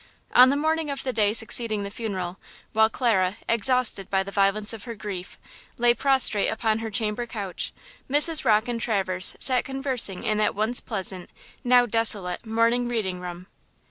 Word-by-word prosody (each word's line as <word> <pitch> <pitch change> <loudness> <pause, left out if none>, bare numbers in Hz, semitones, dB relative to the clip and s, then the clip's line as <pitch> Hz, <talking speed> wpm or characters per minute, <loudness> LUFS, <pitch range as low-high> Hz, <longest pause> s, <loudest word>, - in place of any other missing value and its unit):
On 250 +1 +7
the 280 - +1
morning 315 +1 -1
of 275 -1 -5
the 255 - -3
day 210 -3 +1
succeeding 225 -1 +1
the 200 - -7
funeral, 190 -5 -5 0.3
while 220 0 +3
Clara, 210 -6 0
exhausted 230 -3 +2
by 195 -1 0
the 200 - -9
violence 200 +2 +1
of 220 -2 -9
her 235 -2 -7
grief, 195 -4 -8 0.4
lay 240 0 +3
prostrate 260 -5 +3
upon 220 0 -1
her 225 0 -5
chamber 215 +2 -2
couch, 200 -6 -5 0.4
Mrs. 300 +3 +3
Rocke 220 -2 +2
and 235 -1 -4
Traverse 190 -5 +1
sat 255 -2 +2
conversing 265 -8 +1
in 215 -1 -1
that 210 - 0
once 220 +4 0
pleasant, 190 -4 -5 0.3
now 245 0 +4
desolate, 210 -5 0
morning 230 +2 +1
reading 205 -7 -3
room. 180 0 -8
220 Hz, 170 wpm, -24 LUFS, 200-245 Hz, 0.4 s, On